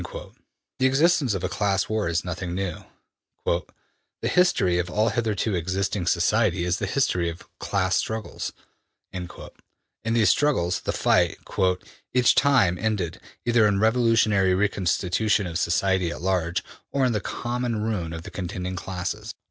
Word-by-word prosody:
'' - - -53
The 130 - +6
existence 140 - +3
of 95 - -4
a - - +1
class 100 -1 0
war 110 -4 -1
is 85 +1 -1
nothing 90 0 -4
new: 95 -3 -4 0.6
``The 85 -2 0 0.6
history 95 - +3
of 85 0 -2
all 110 +5 +2
hitherto 110 -2 -1
existing 95 +1 -1
society 90 +1 +2
is 90 +1 0
the 100 - -2
history 90 -8 +1
of 85 - -9
class 95 -1 0
struggles.'' 110 -1 -3 0.6
In 90 -2 -5 0.9
these 110 -5 +5
struggles 130 -13 +1
the - - -2
fight - - +2
``each 95 +6 0
time 100 -11 +4
ended, 100 -7 -2 0.2
either 115 -3 +4
in 100 - +2
a - - 0
revolutionary 110 -4 +3
re 105 +2 +2
constitution 100 +3 +1
of 85 -1 -3
society 90 +1 +1
at 85 - -6
large, 90 -3 0 0.3
or 135 -2 +2
in 125 - +2
the 105 -3 -1
common 120 -2 -2
ruin 100 -7 -2
of 80 0 -6
the - - -9
contending 90 0 -4
classes.'' 90 -1 -5
95 Hz, 155 wpm, -25 LUFS, 90-110 Hz, 0.9 s, The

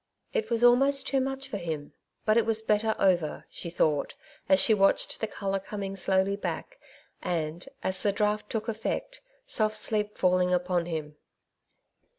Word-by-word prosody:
^^ - - -54 0.3
It 475 -3 -1
was 235 0 +2
almost 270 +3 +5
too 270 -1 +2
much 270 +1 -3
for 215 - -4
him; 160 -5 -5 0.3
but 215 - +4
it 230 - +4
was 220 0 +1
better 220 0 +2
over," 175 -5 +1
she 170 - -5
thought, 155 -4 0 0.3
as 190 - +6
she 220 - +5
watched 195 -2 +2
the 220 - 0
colour 195 -2 -2
coming 195 0 -5
slowly 190 +1 +2
back, - - -5 0.4
and, 165 +4 -3
as 190 0 0
the 205 - +2
draught 210 +1 0
took 220 -1 -2
efiect, 230 - -3 0.3
soft 215 - +1
sleep 210 -1 -1
falling 180 0 +3
upon 180 -1 +1
him. 155 -3 -5
205 Hz, 165 wpm, -28 LUFS, 180-225 Hz, 0.4 s, as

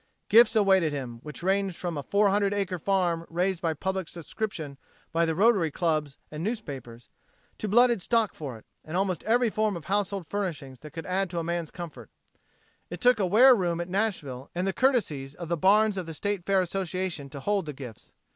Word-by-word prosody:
Gifts 230 +1 +6
awaited 190 -6 +4
him, 125 -5 -5
which 150 +3 -9
ranged 195 -1 +1
from 175 -1 -4
a 145 - -3
four 200 +7 +2
hundred 200 0 +1
acre 190 -3 -2
farm 175 -2 +1
raised 180 +1 -1
by 165 -3 0
public 190 +2 -2
subscriptions 165 -5 -5 0.3
by 165 0 +2
the 160 - 0
Rotary 200 -4 +4
Clubs 155 -3 -1
and 155 +1 -5
newspapers, 140 - -5 0.5
to 215 - -3
blooded 240 0 +4
stock 225 +1 +1
for 135 -7 -7
it, 110 - -18 0.2
and 160 +3 -4
almost 190 -3 -1
every 235 +1 +3
form 215 -3 0
of 165 - -11
household 200 -2 -1
furnishings 155 -10 -4
that 150 +1 -12
could 165 - -6
add 190 +1 0
to 170 -1 -3
man's 170 -1 -2
comfort. 170 -3 -9 0.8
It - - -6
took 250 -2 +4
a 190 - +2
ware 245 +8 +7
room 175 -6 0
at 175 +1 -4
Nashville 175 - -2
and 180 +2 -1
the 195 - 0
courtesies 155 - 0
of 170 0 -7
the 170 - +1
barns 205 +5 +4
of 180 -3 -4
the 165 - -6
State 200 0 -3
Fair 195 -1 +4
Association 180 -4 -3
to 140 - -8
hold 195 +3 -1
the - - -3
gifts. 125 -5 -10
180 Hz, 200 wpm, -27 LUFS, 155-200 Hz, 0.8 s, ware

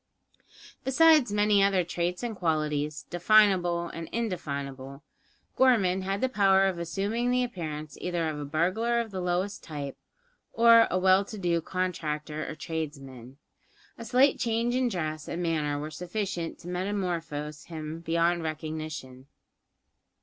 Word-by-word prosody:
Besides 295 -2 +5
many 205 0 +3
other 195 -2 +3
traits 175 +3 -3
and 235 -2 -3
qualities, 150 -4 -1
definable 175 -2 +4
and 165 -1 -7
indefinable, 140 - -4 0.5
Gorman 205 -8 +3
had 195 +1 -2
the 260 - +3
power 195 -5 +4
of 190 -3 -1
assuming 205 +8 -1
the 250 0 +2
appearance 155 - -6
either 175 -2 -1
of 155 -1 -3
a 145 - -4
burglar 185 +11 +1
of 230 -2 -3
the 190 -1 -4
lowest 180 +3 -2
type, 145 -3 -6 0.6
or 230 0 +7
a 185 - 0
well 190 +1 +4
to 215 - -8
do 175 -3 0
contractor 155 -4 -3
or 155 - -6
tradesman. 135 -6 -6 0.6
A - - -9
slight 255 +5 +3
change 235 0 0
in 255 -1 +1
dress 155 -6 -4
and 175 - -3
manner 155 -3 0
were 150 +2 -5
sufficient 180 0 -4
to 175 - -11
metamorphose 175 -6 -3
him 160 -1 -6
beyond 170 +1 +1
recognition. 155 -4 -6
175 Hz, 140 wpm, -28 LUFS, 155-205 Hz, 0.6 s, or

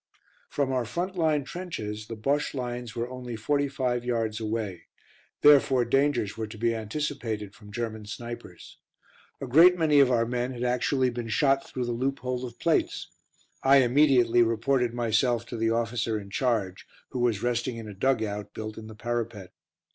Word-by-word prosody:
From 140 -2 -1
our 130 -2 +1
front 175 - -3
line 155 -4 +2
trenches 110 - -6
the 115 - -6
Bosche 140 +7 -1
lines 120 -2 -4
were 120 0 -2
only 125 -2 -6
forty 140 +6 0
five 130 -3 -1
yards 115 -3 -1
away, 110 -5 -4 0.5
therefore 135 -4 +6
dangers 125 -4 +1
were 110 -1 -4
to 110 +1 -10
be 115 +1 +1
anticipated 110 -3 -4
from 105 -4 -14
German 110 -2 -4
snipers. 120 +2 -9 0.6
A - - -4
great 165 +8 +6
many 155 -3 +4
of 135 -2 +6
our 115 -2 +2
men 125 +2 -2
had 120 0 -5
actually 125 +1 +1
been 120 -1 -5
shot 135 +4 +2
through 125 -1 -3
the 120 - -2
loophole 130 0 -2
of 120 - -12
plates. - - 0 0.5
I 135 +1 +6
immediately 125 -2 +4
reported 120 +2 +1
myself 120 0 +1
to 120 - -7
the 115 0 +1
officer 115 -1 0
in 100 -1 -11
charge, 105 -5 -1 0.2
who 125 - -4
was 120 -4 +1
resting 120 0 -1
in 115 -1 -7
a 105 - -7
dug 120 +3 +1
out, 105 -1 -5
built 110 0 -6
in 110 - -10
the 110 - -10
parapet. 115 -4 -4
120 Hz, 175 wpm, -27 LUFS, 110-135 Hz, 0.6 s, therefore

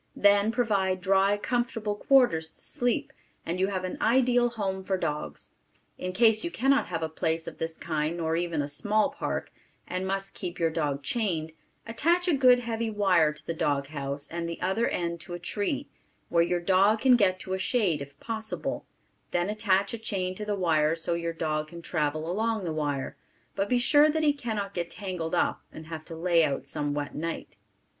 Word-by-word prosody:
Then 205 +1 +4
provide 200 -6 +1
dry, 195 +2 +3
comfortable 225 -2 -1
quarters 205 -10 +3
to - - -14
sleep, 245 -5 -1 0.3
and 170 +2 -2
you 190 - +3
have 190 -2 -2
an 185 - -4
ideal 245 0 +4
home 195 -5 -3
for 190 0 0
dogs. 150 -4 -4 0.5
In 185 - -3
case 220 +2 +4
you 340 - -1
cannot 275 -1 +2
have 165 -2 -3
a - - 0
place 160 +1 -2
of - - -8
this 165 0 -3
kind 155 +1 -2
nor 160 -1 0
even 170 -3 -1
a - - -3
small 215 - +1
park, 285 - -3 0.4
and 185 +1 -3
must 195 0 -2
keep 180 -1 -6
your 165 -1 +1
dog 145 -3 -1
chained, 165 - -1 0.3
attach 340 +10 +1
a 350 - +4
good 255 -3 +6
heavy 230 -2 -2
wire 190 -7 +3
to 150 - -11
the 165 - -2
dog 145 -3 0
house 140 -1 -4
and 170 0 -4
the 170 - -5
other 190 +6 +1
end 170 -1 -2
to 175 +2 -7
a - - -7
tree, 210 - -2 0.4
where 170 - +3
your 175 +1 +1
dog 195 +5 +3
can 255 -1 +6
get 190 -5 +3
to 185 - -4
a 190 - -1
shade 185 - +1
if 140 0 -10
possible; 220 -1 -4 0.4
then 175 +3 0
attach 200 -2 +1
a 230 - -4
chain 190 -4 -2
to 210 +3 -6
the 210 -1 -1
wire 160 -4 +2
so 165 +1 -1
your 170 0 -2
dog 155 -2 -2
can 170 +1 -10
travel 155 -1 -1
along 220 +3 0
the 165 -3 -2
wire; 145 -3 -2 0.4
but 195 +1 -1
be 250 - +3
sure 290 +5 +5
that 315 +1 0
he 295 -1 +4
cannot 220 -7 -3
get 170 -1 -3
tangled 180 -3 -3
up - - +1
and 155 - -10
have 160 -1 -7
to 165 0 -7
lay 170 0 +3
out 140 -3 -1
some 145 +1 -2
wet 145 -1 -3
night. 165 +2 -5
185 Hz, 200 wpm, -28 LUFS, 165-220 Hz, 0.5 s, good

